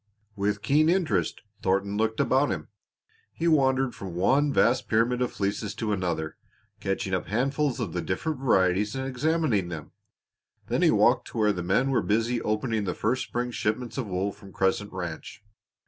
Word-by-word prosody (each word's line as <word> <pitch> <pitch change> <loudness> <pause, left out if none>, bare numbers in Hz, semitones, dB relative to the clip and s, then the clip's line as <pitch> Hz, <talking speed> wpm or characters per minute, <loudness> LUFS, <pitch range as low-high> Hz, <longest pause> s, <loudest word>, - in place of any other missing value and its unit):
With 105 0 -1
keen 155 +3 +4
interest 155 - +1 0.2
Thornton 100 +2 0
looked 110 +1 0
about 135 +3 +3
him. 75 -5 -4 0.6
He 170 - -1
wandered 135 -4 +3
from 95 -3 -7
one 135 +11 +3
vast 125 -1 +2
pyramid 115 +3 +2
of 125 - 0
fleeces 100 +1 -2
to 110 -2 -2
another, 85 -5 -2 0.4
catching 95 -1 -2
up 90 - -1
handfuls 135 +5 0
of - - -3
the - - -1
different 160 -4 -2
varieties 105 -4 +2
and 130 0 -3
examining 135 - +1
them. 80 -4 -7 0.7
Then - - -1
he - - +5
walked - - +3
to - - -8
where 105 -2 +3
the 90 - -4
men 100 +10 +1
were 130 - +2
busy 115 +3 0
opening 110 0 -1
the 90 - -2
first 120 +5 0
spring 120 0 -3
shipments 120 +1 -2
of 130 -5 -3
wool 95 +1 -1
from 100 -1 -14
Crescent 95 +2 0
Ranch. 90 +2 -6
110 Hz, 175 wpm, -27 LUFS, 95-130 Hz, 0.7 s, he